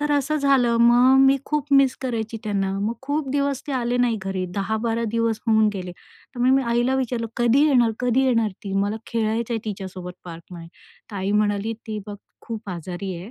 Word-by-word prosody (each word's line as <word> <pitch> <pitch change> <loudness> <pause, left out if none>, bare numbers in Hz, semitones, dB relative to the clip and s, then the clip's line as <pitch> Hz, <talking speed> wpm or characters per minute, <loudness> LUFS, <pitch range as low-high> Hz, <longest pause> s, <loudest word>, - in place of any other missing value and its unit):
तर 295 0 -1
असं 290 +2 +1
झालं. 270 -5 +3
मग 245 +3 +6
मी 270 +1 +5
खूप 300 -2 -1
मिस 270 -1 +4
करायची 230 -3 -3
त्यांना. 195 -2 -1
मग 220 +3 -1
खूप 285 +1 -2
दिवस 280 -1 0
ते 290 - -3
आले 245 -1 0
नाही 245 -2 +2
घरी 190 -1 -3
10-12 220 +3 -1
दिवस 230 -1 0
होऊन 220 -1 +4
गेले. 180 -2 -5 0.4
त्यामुळे 245 +1 +2
मी 270 - +2
आईला 240 +2 +2
विचारलं, 245 -3 -2
"कधी 240 +4 +3
येणार, 245 -6 +3
कधी 250 +1 +2
येणार 230 -4 +2
ती, 195 - -4
मला 205 +2 -1
खेळायचंय 225 +1 -1
तिच्यासोबत 190 -3 -6
पार्कमध्ये?" 170 0 -10 0.4
तर 205 - -6
आई 195 +1 -2
म्हणाली, 210 +1 +1
"ती 215 -1 -4
बघ 205 - -7 0.3
खूप 225 -3 -7
आजारी 180 +2 -5
आहे." 195 +6 -10
230 Hz, 185 wpm, -23 LUFS, 205-255 Hz, 0.4 s, मग